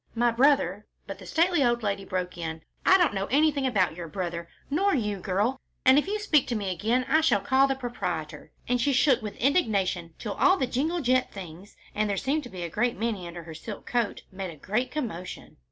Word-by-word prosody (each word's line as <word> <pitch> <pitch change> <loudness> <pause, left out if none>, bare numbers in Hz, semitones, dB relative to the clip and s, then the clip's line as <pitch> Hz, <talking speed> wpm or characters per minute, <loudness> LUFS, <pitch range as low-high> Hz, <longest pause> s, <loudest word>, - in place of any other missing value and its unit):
"My 240 +1 +3
brother 230 - +2
" - - -46
But - - -7
the - - -11
stately 340 -2 +2
old 240 -2 +1
lady 200 -1 -1
broke 180 -1 -3
in, 160 -2 -5 0.2
"I 380 - +8
don't 350 - +3
know 195 0 -2
anything 285 0 +2
about 190 -9 +1
your 170 -1 -6
brother, 170 -1 -4 0.2
nor 380 +7 +2
you, 210 -6 -1
girl, 205 +8 0 0.3
and 265 +2 +7
if 300 - -3
you 415 +2 -1
speak 325 -10 +2
to 240 - -1
me 200 -3 -2
again, 225 +8 0
I 310 +4 +4
shall 320 -9 +3
call 265 +7 +3
the 270 - 0
proprietor," 175 - -5 0.2
and 245 0 +1
she 280 +2 +2
shook 265 0 +4
with 210 -1 -6
indignation 200 - +1
till 210 -3 -4
all 375 +1 +4
the 260 - +1
jingling 310 +7 -1
jet 255 0 +2
things, 185 0 -10 0.2
and 215 0 0
there 200 - -1
seemed 285 +9 0
to - - -8
be 180 -4 -6
a - - -2
great 235 +7 0
many 210 -5 -2
under 170 0 -8
her 165 -1 -9
silk 200 +6 -8
coat, 240 -4 -1
made 190 -1 -5
a 165 - -9
great 215 - -2
commotion. 215 - -6
225 Hz, 225 wpm, -27 LUFS, 185-270 Hz, 0.3 s, I